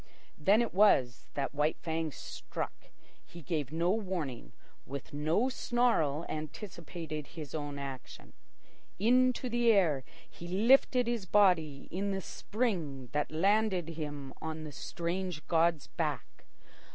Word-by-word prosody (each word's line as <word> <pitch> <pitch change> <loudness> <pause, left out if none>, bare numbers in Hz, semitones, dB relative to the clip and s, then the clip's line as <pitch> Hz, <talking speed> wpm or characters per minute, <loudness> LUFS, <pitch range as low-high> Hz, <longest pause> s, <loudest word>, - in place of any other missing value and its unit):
Then 200 +9 +5
it 235 - -4
was 135 - +4
that 140 - -1
White 150 +2 +1
Fang 160 -1 -2
struck. - - -5 0.5
He 170 -1 -12
gave 145 -3 -2
no 170 +3 +1
warning, 180 - -3 0.3
with 140 +3 -7
no 155 - +2
snarl 240 - +1
anticipated 155 -1 -6
his 150 -3 -6
own 145 -2 -4
action. 135 -2 -8 0.6
Into 250 +4 +3
the 240 -1 +3
air 165 -10 +3 0.2
he 175 - -10
lifted 245 +6 +4
his 230 -5 -2
body 165 -9 +3
in 195 +3 -1
the 195 -1 -1
spring 170 - -2
that 150 +1 0
landed 190 0 +2
him 145 -4 -5
on 160 0 -4
the 155 - -6
strange 170 +3 -3
god's 165 -3 +3
back. - - -4
165 Hz, 125 wpm, -32 LUFS, 150-205 Hz, 0.6 s, Then